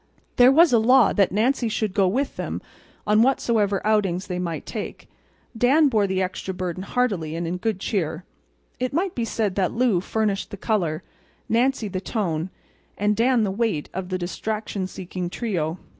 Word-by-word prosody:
There 245 +1 +7
was 320 0 +6
a 230 - +6
law 250 +4 +5
that 200 -3 +3
Nancy 235 +4 +1
should 215 -2 -1
go 195 -2 +3
with 260 +9 -1
them - - -4 0.5
on 210 +1 +4
whatsoever 225 -6 +1
outings 195 -4 +1
they 180 -2 -4
might 170 -3 -4
take. - - -6 0.5
Dan 275 +6 +4
bore 215 -5 +2
the 190 0 0
extra 185 0 -4
burden 185 -1 -4
heartily 195 -8 -1
and 170 +1 -3
in 175 +2 -2
good 215 0 -2
cheer. 175 -5 -2 0.6
It 255 +1 -2
might 355 +4 0
be 235 - -2
said 215 -3 -1
that 185 -2 +1
Lou 235 -6 +2
furnished 210 0 -1
the 200 - -8
color, 180 -6 -1 0.4
Nancy 240 0 +1
the 185 -1 -4
tone, 180 -6 -2 0.5
and 210 +1 +1
Dan 240 +1 +3
the 200 - 0
weight 205 -7 -1
of 185 0 -4
the 185 - -1
distraction 200 +2 -3
seeking 180 -1 -5
trio. 175 -6 -2
205 Hz, 175 wpm, -23 LUFS, 185-230 Hz, 0.6 s, There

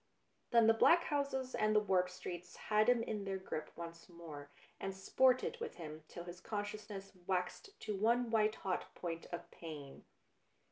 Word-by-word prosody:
Then 235 -2 +6
the 225 - +7
black 340 +9 +6
houses 280 -3 -1
and 215 0 +2
the - - +8
warped 185 -3 +2
streets 180 -1 -7
had 215 +2 +3
him 240 -2 +4
in 210 -3 -2
their 195 -1 -2
grip 155 -5 -4
once 170 0 -8
more, 160 -4 -9 0.3
and 195 0 -3
sported 260 - +3
with 465 - -4
him 155 -2 -8
till 175 - -7
his 175 +1 -8
consciousness 205 -1 -4 0.2
waxed 180 - -2
to 210 - -2
one 230 +4 +3
white 215 -1 +3
hot 185 -2 -3
point 165 -2 -4
of 175 - -6
pain. 150 -5 -8
195 Hz, 170 wpm, -37 LUFS, 175-230 Hz, 0.3 s, the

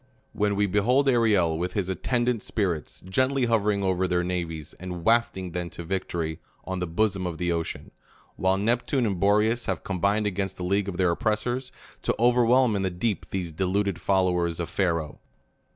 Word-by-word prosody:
When 105 -1 +1
we 105 +1 +2
behold 120 +8 +2
Ariel, 105 -10 +3
with 90 +1 -2
his 100 -4 -1
attendant 120 +5 0
spirits, 90 - -2
gently 130 +8 +1
hovering 105 -3 +1
over 95 -1 +1
their 90 0 +1
navies, 85 -3 -4
and 90 -2 -6
wafting 115 -6 +2
them 90 0 -3
to 85 - -7
victory 85 -3 -3 0.3
on 95 0 -3
the 90 - -2
bosom 95 +1 0
of 85 -2 -5
the 85 0 -1
ocean; 85 -1 -3 0.4
while 95 +1 +1
Neptune 120 +5 +1
and 100 -5 -1
Boreas 105 +4 +2
have 95 -5 -2
com 95 -3 -4
bined 105 +2 +2
against 95 -1 -2
the 90 - -5
league 100 +2 0
of 90 - -5
their 90 -2 +3
oppressors, 120 +6 -1 0.3
to - - 0
over 120 +1 +4
whelm 125 -1 +4
in 100 - 0
the 95 - 0
deep 95 +4 -2
these 90 -3 -3
deluded 95 +1 -1
followers 90 -3 +1
of 85 - -3
Pharaoh 85 -6 -1
95 Hz, 185 wpm, -26 LUFS, 90-110 Hz, 0.4 s, over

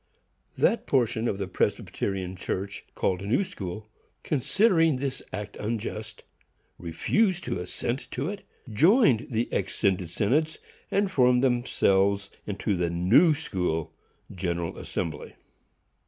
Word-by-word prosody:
That 230 - +2
portion 120 -3 +1
of 100 - -1
the 100 -1 -3
Presbyterian 95 0 -2
Church 95 +2 -4
called 90 -1 0
New 105 - +1
School, 105 - -7 0.4
considering 165 - +3
this 135 0 -3
act 105 +1 -6
unjust, 110 0 -4 0.6
refused 185 - +1
to - - -3
assent 120 +8 -3
to 135 +4 -3
it, 200 +1 -5 0.3
joined 160 - +4
the 115 0 0
exscinded 95 -2 0
synods, 145 - +1 0.3
and 200 -1 +1
formed 125 -4 +4
themselves 100 -6 +2 0.2
into 100 0 -1
the 85 -1 0
New 110 - +5
School 90 - -2 0.4
General 85 -2 -2
Assembly. 80 -3 -4
110 Hz, 115 wpm, -27 LUFS, 95-140 Hz, 0.6 s, New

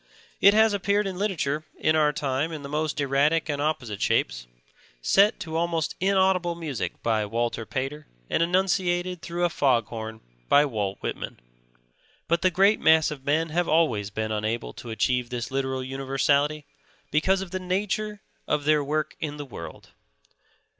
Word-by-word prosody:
It 200 +1 +6
has 220 -1 +5
appeared 200 +1 +1
in 190 -2 -4
literature 155 -7 -1
in 155 - +2
our 150 -1 +4
time 145 +2 -1
in 155 -3 -6
the - - -6
most 150 +1 -2
erratic 145 +4 +2
and 145 -1 -1
opposite 130 -9 -2
shapes, - - 0 0.5
set 200 - +4
to 160 -5 -5
almost 165 -1 0
inaudible 190 -2 +2
music 155 -8 -5
by 110 -2 +1
Walter 115 +1 -2
Pater 145 +3 -4 0.2
and - - 0
enunciated 180 0 +1
through 175 +1 -1
a - - +2
foghorn 115 -5 0 0.3
by 145 +1 +6
Walt 105 -7 -2
Whitman. - - -5 0.9
But 170 0 +1
the 185 - +4
great 195 +4 +4
mass 160 -1 +4
of 135 -3 -8
men 160 +3 +1
have 175 +3 0
always 125 -12 +2
been 110 +1 -3
unable 110 +2 -2
to 120 - -10
achieve 125 +2 0
this 125 0 -4
literal 130 -1 -1
universality, 135 +3 0 0.5
because 185 +6 +2
of 190 -3 -7
the 185 - -2
nature 205 +3 -2 0.3
of 150 -1 0
their 150 0 +3
work 155 +2 -2
in 150 -2 -4
the 145 - -6
world. 85 - -10
150 Hz, 160 wpm, -26 LUFS, 130-175 Hz, 0.9 s, It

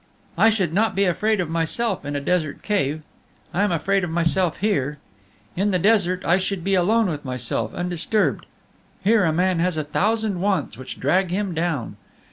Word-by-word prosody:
"I 225 - +5
should 195 -7 0
not 220 +4 +1
be 200 - +2
afraid 210 +4 +1
of 180 - 0
myself 170 +6 -1
in 145 0 -4
a - - 0
desert 155 0 -1
cave; 155 -7 -1 0.5
I 180 - +1
am 205 -2 +2
afraid 195 +4 +1
of 175 - -2
myself 170 +1 +1
here. 150 -9 0 0.6
In 200 +3 +1
the 185 - +2
desert 185 -2 +2
I 175 +2 +4
should 190 -1 -2
be 195 +2 0
alone 210 +5 +3
with 155 -6 -3
myself, 125 -4 -2
undisturbed; 180 +4 -1 0.6
here 200 -4 +3
man 180 +2 +1
has 175 -1 0
a 155 - 0
thousand 210 +5 0
wants 195 - 0
which 130 +2 -9
drag 180 +7 +2
him 190 0 -2
down. 160 -11 -2
180 Hz, 180 wpm, -22 LUFS, 160-200 Hz, 0.6 s, I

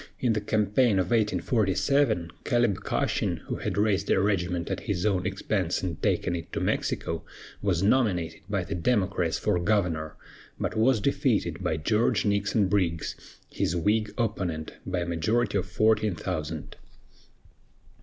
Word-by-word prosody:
In 120 -3 +2
the 105 - -1
campaign 105 +3 +2
of 95 -1 0
1847, 110 0 +1
Caleb 120 -5 +2
Cushing, - - 0
who - - -3
had - - -3
raised 100 -2 +1
a - - +4
regiment 90 -4 0
at - - -1
his 95 -2 -2
own 95 -4 +1
expense 95 -2 -1
and 85 -4 -4
taken 90 - +1
it 85 - -7
to - - -1
Mexico, 80 0 -1 0.4
was 95 -3 +1
nominated 95 -8 +1
by 100 -3 0
the - - -5
Democrats 95 -3 +1
for 90 - +1
governor, 85 -5 0 0.4
but - - -2
was 110 0 +3
defeated - - 0
by 80 - 0
George 110 +10 +1
Nixon 100 0 +2
Briggs, 90 -5 0 0.4
his 85 - -1
Whig 105 +5 +1
opponent, 90 -9 -2
by 90 -1 -1
a - - -1
majority 100 +5 +1
of - - -4
fourteen 110 -3 +2
thousand. 80 -3 -4
95 Hz, 145 wpm, -27 LUFS, 85-110 Hz, 0.4 s, a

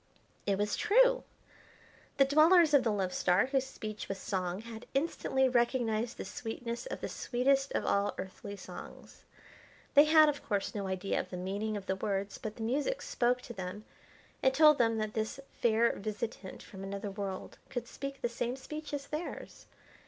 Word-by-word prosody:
It 200 -1 +2
was 205 +1 0
true! - - +4 0.9
The 275 - +6
dwellers 310 +3 +6
of 280 -3 +6
the 230 - +2
Love 190 -3 -1
Star, 180 +4 +3
whose 265 0 0
speech 215 -5 -7
was 195 - -2
song, 185 -1 -2
had 225 0 -9
instantly 270 -3 +1
recognised 240 -2 +1
the - - -5
sweetness 235 - -5
of - - -5
the - - -2
sweetest 270 +2 +1
of - - 0
all 200 +1 +1
earthly 190 +2 -7
songs. - - -11 0.7
They 290 +1 +8
had, 310 0 +7
of 290 -1 -1
course, 200 -2 -1
no 200 -2 -3
idea 190 +1 -1
of - - -4
the 180 - -5
meaning 200 +4 -2
of 200 - -7
the 190 - 0
words; 195 0 -2
but 215 -1 -5
the 225 - -6
music 285 - 0
spoke 250 +1 +1
to 235 - -8
them 190 +1 -6 0.6
and 265 0 +3
told 305 0 +7
them 225 -1 +3
that 215 -1 -2
this 220 +5 -2 0.2
fair 235 0 +3
visitant 210 -1 -5
from 190 -1 -10
another 200 +1 -4
world 195 -1 -5
could 240 -2 -4
speak 275 +2 -6
the - - +3
same 240 +1 -2
speech 300 +2 -6
as 280 -1 -5
theirs. 305 +4 -6
230 Hz, 180 wpm, -32 LUFS, 200-275 Hz, 0.9 s, They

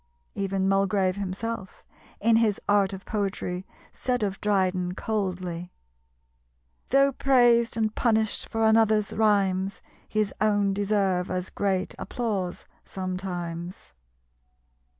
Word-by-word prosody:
Even 195 -1 -1
Mulgrave 195 -1 +2
himself, 200 +1 -5 0.3
in 225 +1 +4
his 220 -3 +2
Art 200 -1 +3
of 195 -1 -8
Poetry 195 -3 -3 0.3
said 250 -3 -1
of 195 -2 -2
Dryden 185 -3 +1
coldly 180 -5 -3 1.2
"Though 275 +1 +4
praised 240 -4 +3
and 215 -1 0
punished 220 -3 +1
for 225 0 0
another's 220 -2 +3
rhymes, 195 -3 +1 0.3
His 215 -2 0
own 205 -2 +2
deserve 195 -3 +1
as 180 0 -3
great 190 -2 -1
applause 200 -7 -3 0.2
sometimes." 180 - -5
200 Hz, 105 wpm, -26 LUFS, 185-220 Hz, 1.2 s, in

